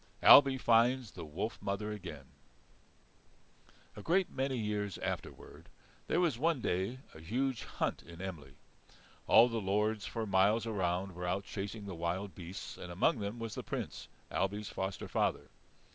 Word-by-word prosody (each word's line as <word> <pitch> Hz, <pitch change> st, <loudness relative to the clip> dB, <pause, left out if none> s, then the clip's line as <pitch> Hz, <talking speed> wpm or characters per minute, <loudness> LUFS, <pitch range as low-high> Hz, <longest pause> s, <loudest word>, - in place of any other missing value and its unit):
Ailbe 135 Hz, -2 st, +9 dB
finds 120 Hz, 0 st, +3 dB
the 85 Hz, -, -8 dB
Wolf 95 Hz, +7 st, -4 dB
Mother 100 Hz, +1 st, -2 dB
again 85 Hz, -9 st, -7 dB, 1.7 s
A -, -, -8 dB
great 180 Hz, +2 st, +2 dB
many 130 Hz, -1 st, -1 dB
years 105 Hz, -2 st, -2 dB
afterward -, -, -6 dB, 0.4 s
there -, -, +2 dB
was 160 Hz, -10 st, +1 dB
one 160 Hz, 0 st, +2 dB
day 95 Hz, +3 st, -1 dB, 0.2 s
a -, -, -11 dB
huge 125 Hz, +8 st, -1 dB
hunt -, -, -2 dB
in 85 Hz, 0 st, -12 dB
Emly. 85 Hz, -7 st, -7 dB, 0.7 s
All 120 Hz, -, +8 dB
the 115 Hz, -2 st, -2 dB
lords 105 Hz, +2 st, 0 dB
for 115 Hz, -2 st, -3 dB
miles 100 Hz, +3 st, +3 dB
around 95 Hz, -3 st, -1 dB
were 90 Hz, +1 st, -5 dB
out 95 Hz, +2 st, 0 dB
chasing 100 Hz, +2 st, -5 dB
the 100 Hz, -, -5 dB
wild 85 Hz, +3 st, -3 dB
beasts, 90 Hz, +2 st, -8 dB
and 90 Hz, -, -7 dB
among 90 Hz, +5 st, +2 dB
them 100 Hz, +3 st, -4 dB
was 115 Hz, -2 st, -5 dB
the -, -, -4 dB
Prince, -, -, -5 dB, 0.2 s
Ailbe's 105 Hz, +2 st, -1 dB
foster 95 Hz, 0 st, -4 dB
father. -, -, -1 dB
100 Hz, 155 wpm, -33 LUFS, 95-115 Hz, 1.7 s, Ailbe